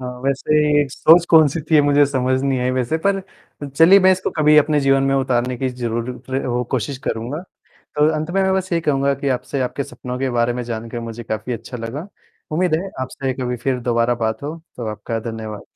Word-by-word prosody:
हाँ, 125 -1 -5
वैसे 145 +1 +2
सोच 165 +5 +5
कौन-सी 160 -1 +5
थी 155 - +6
मुझे 145 0 +4
समझ 130 -1 0
नहीं 135 -2 0
आई 125 +1 0
वैसे 130 +5 -1
पर 195 -1 +2 0.5
चलिए 165 +8 +6
मैं 190 0 +6
इसको 185 0 -2
कभी 150 -1 +5
अपने 150 0 +4
जीवन 135 0 +3
में 135 0 +1
उतारने 125 -2 0
की 130 +1 -1
ज़रूर 120 -1 -3 0.2
प्र 130 - -1 0.2
अ, - - 0
कोशिश 130 +1 -2
करूँगा। 125 +9 -3 0.5
तो 150 +1 +4
अंत 155 +2 -3
में 195 - +1
मैं 190 0 +2
बस 185 0 -2
यही 165 -1 +1
कहूँगा 140 -2 +1
कि 140 +1 -4
आपसे 130 +2 -2
आपके 130 +2 -2
सपनों 125 -1 -7
के 135 0 0
बारे 120 0 +1
में 125 0 -4
जानके 115 0 -5
मुझे 115 0 -7
काफ़ी 110 +3 -4
अच्छा 115 +2 -7
लगा। 125 - -6 0.4
उम्मीद 175 +1 +1
है 190 +4 -4
आपसे 130 0 -3
कभी 125 -1 -2
फिर 125 +2 -1
दोबारा 120 0 +1
बात 110 +3 -2
हो। 150 +3 -4 0.2
तो 120 - -5
आपका 115 +1 -4
धन्यवाद। 110 -2 -7
135 Hz, 210 wpm, -20 LUFS, 120-150 Hz, 0.5 s, थी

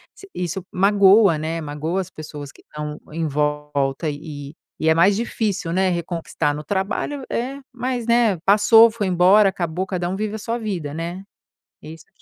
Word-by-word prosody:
s 390 - -14
isso 180 +1 -4
magoa, 195 -1 +5
né, 160 +2 -3
magoa 155 +5 -3
as 190 0 -5
pessoas 150 -2 -9
que - - -20
estão 150 0 -7
em 165 +1 -2
volta. 150 0 -1
E 145 -1 -7 0.3
e 160 - +2
é - - +6
mais 190 +4 +4
difícil, 210 -6 -2
né, 185 +2 +2
reconquistar. 165 -3 -2
No 150 - -6
trabalho, 205 - -2
é, 265 +4 -3
mas, 250 -1 -3
né, 235 -5 +3
passou. 225 +3 +6
Foi 215 -3 -3
embora. 190 +3 +5
Acabou. 180 -1 -3
Cada 180 -2 -2
um 190 - -2
vive 215 +1 -3
a - - -3
sua 230 +2 -3
vida, 185 -11 -4
né? 170 +4 -5 0.6
Isso 155 +1 -11
te - - -30
180 Hz, 175 wpm, -21 LUFS, 155-205 Hz, 0.6 s, é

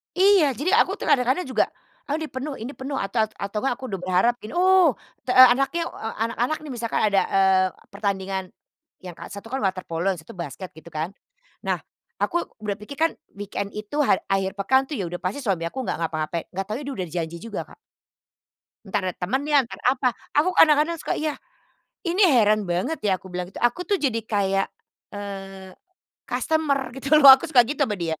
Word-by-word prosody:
Iya! 370 -7 +5
Jadi 300 +9 -1
aku 430 - +4
tuh - - -3
kadang-kadang 260 +6 +3
juga, 260 -6 +1 0.4
"Aduh 305 +3 -2
ini 310 - -5
penuh 275 +3 -5
ini 240 +1 -6
penuh," 275 +1 -6
ata 220 -1 0
atau 200 +2 -4
enggak 260 +1 0
aku 260 - -11
udah 195 - -3
berharap 185 +6 +2
gini, 215 - -9
"oh, 365 -4 +5 0.3
te 250 - 0
anaknya, 270 +6 +5
eee, 225 - -6
anak-anak 245 +6 -1
nih," 300 - -8
misalkan 235 -2 -2
ada, 200 -2 +3
eee, 190 -1 +3 0.2
pertandingan 195 -2 -2 0.6
yang 180 -2 -9
ka - - -8
1 205 +3 -10
kan 265 - -2
water 190 -4 -1
polo, 165 +2 -4
yang - - -12
1 160 - -13
basket 180 +2 -6
gitu 160 +2 -16
kan. 160 +2 -4 0.6
Na,h - - -1 0.4
aku 345 - 0 0.2
udah 205 -1 -3
pikir 210 +7 -9
kan 325 +3 +2 0.2
weekend 200 0 -5
itu 215 +8 -5
ha - - +5 0.2
akhir 195 -1 0
pekan 260 +7 +2
tuh 300 - -5
ya 210 - -2
udah 175 - -4
pasti 185 +12 -4
suami 185 -8 -1
aku 260 +10 -4
nggak - - -3
ngapa-ngapain, 160 0 -3
nggak 195 - -1
tahunya 230 +8 -4
dia 280 - -4
udah 185 - -3
ada - - -11
janji 165 +1 -5
juga, 230 - -5
Kak. - - -17 1.1
Entar 205 +1 -1
ada 180 - -5
temennya, 275 +9 +1
entar 235 - -10
apa, 255 -1 +2 0.2
aku 335 +5 +3
kadang-kadang 310 +1 +5
suka - - -2
iya, 305 -1 -3 0.6
"Ini 365 +3 +2
heran 215 -3 +4
banget 180 - -1
ya," 190 -3 +1
aku 190 - -12
bilang 180 0 -4
gitu, - - -8
"aku 240 +9 +1
tuh 400 +1 0
jadi 250 -6 +1
kayak, 195 -2 +1 0.5
eee, 195 -2 -7 0.6
kastemer," 285 -5 0
gitu 270 +4 +2
loh. 280 -3 +11
Aku 285 +5 +4
suka 250 -6 +6
gitu 285 +2 -1
sama 210 - -2
dia, 165 -3 -3
230 Hz, 200 wpm, -24 LUFS, 195-285 Hz, 1.1 s, loh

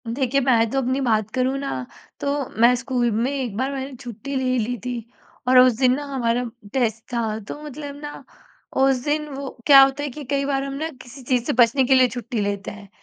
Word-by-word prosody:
देखिए, 265 +3 0
मैं 230 -3 +3
तो 270 - -2
अपनी 260 +2 0
बात 220 -4 +1
करूँ 260 +2 0
ना, 200 - -4 0.3
तो 280 -2 -1
मैं 240 +1 +7
स्कूल 245 -1 -1
में 230 +5 0
एक 260 -7 -3
बार 260 +3 -1
मैंने 270 0 -5
छुट्टी 245 +3 -7
ले 255 -1 +1
ली 240 +2 -2
थी 250 - -2 0.5
और 255 0 +5
उस 255 0 +6
दिन 255 -2 +4
ना 290 +1 -5
हमारा 240 -1 0 0.3
टेस्ट 225 -4 0
था, 220 -2 -1
तो 220 +8 -8
मतलब 290 -1 -7
ना 295 -1 -8 0.6
उस 265 -2 +3
दिन 300 +1 -1
वो 275 -1 -6 0.2
क्या 275 -2 +9
होता 270 +1 +3
है 290 - -2
कि 295 +3 -8
कई 275 +1 -1
बार 275 -1 0
हम 275 0 -5
ना 310 +4 -3
किसी 255 +2 -12
चीज़ 250 -1 +1
से - - 0
बचने 240 +3 +4
के 265 - +3
लिए 255 -1 +6
छुट्टी 240 -1 -4
लेते 200 -1 -3
हैं 205 -1 -12
255 Hz, 220 wpm, -22 LUFS, 235-275 Hz, 0.6 s, क्या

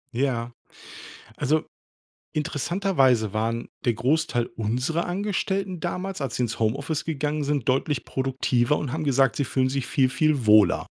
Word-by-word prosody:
Ja, 120 -2 -1 0.8
also 150 +2 +1 0.7
interessanterweise 145 - +1
waren 115 +2 -2 0.2
der 120 - +2
Großteil 125 0 +1
unserer 125 +10 -1
Angestellten 190 -1 -2
damals, 180 +1 -4
als 135 -4 -3
sie 125 - 0
ins 115 -1 -3
Homeoffice 140 +7 -1
gegangen 150 -1 -1
sind, 140 -3 -1
deutlich 135 +1 0
produktiver 130 0 0
und 140 -4 -4
haben 155 +1 -2
gesagt, 135 -1 +3
sie 140 - 0
fühlen 130 +1 +1
sich 135 -2 -2
viel, 130 -2 +2
viel 150 -3 +1
wohler. 105 -3 +5
135 Hz, 140 wpm, -25 LUFS, 120-155 Hz, 0.8 s, wohler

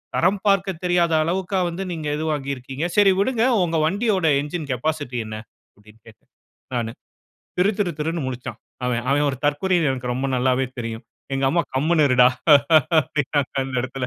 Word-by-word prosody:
தரம் 190 +3 +2
பார்க்கத் 190 -3 +1
தெரியாத 175 -2 +2
அளவுக்கா 185 +3 -1
வந்து, 180 +3 -5
நீங்க 160 -3 -4
இது 160 - -3
வாங்கிருக்கீங்க. 135 +1 -4
சரி 200 -2 +6
விடுங்க. 230 +2 +1 0.2
உங்க 165 -1 -1
வண்டியோட 195 0 0 0.2
என்ஜின் 150 +1 -5
கேபாசிட்டி 145 -1 -2
என்ன?" 110 - -6 0.4
அப்பிடீன்னு 105 +2 -21
கேட்டேன், 110 - -18 0.5
நானு. 115 -1 -2 0.7
திரு 195 +3 +4
திரு 190 -4 +1
திருன்னு 165 0 -2
முழிச்சான் 125 -1 -6 0.3
அவென். 120 -1 -1
அவென் 145 +1 +2
ஒரு 130 - -6
தற்குறின்னு 160 0 +1
எனக்கு 125 -1 -3
ரொம்ப 135 +2 -2
நல்லாவே 130 +1 +1
தெரியும். 115 0 -6 0.3
எங்க 135 0 0
அம்மா, 170 +2 +2
"கம்முனு 155 +3 +2
இருடா!" 125 -1 +6 0.7
அப்பிடீன்னாங்க, 145 0 -2
அந்த 130 -1 -6
இடத்தில. 130 0 -4
150 Hz, 160 wpm, -22 LUFS, 130-175 Hz, 0.7 s, சரி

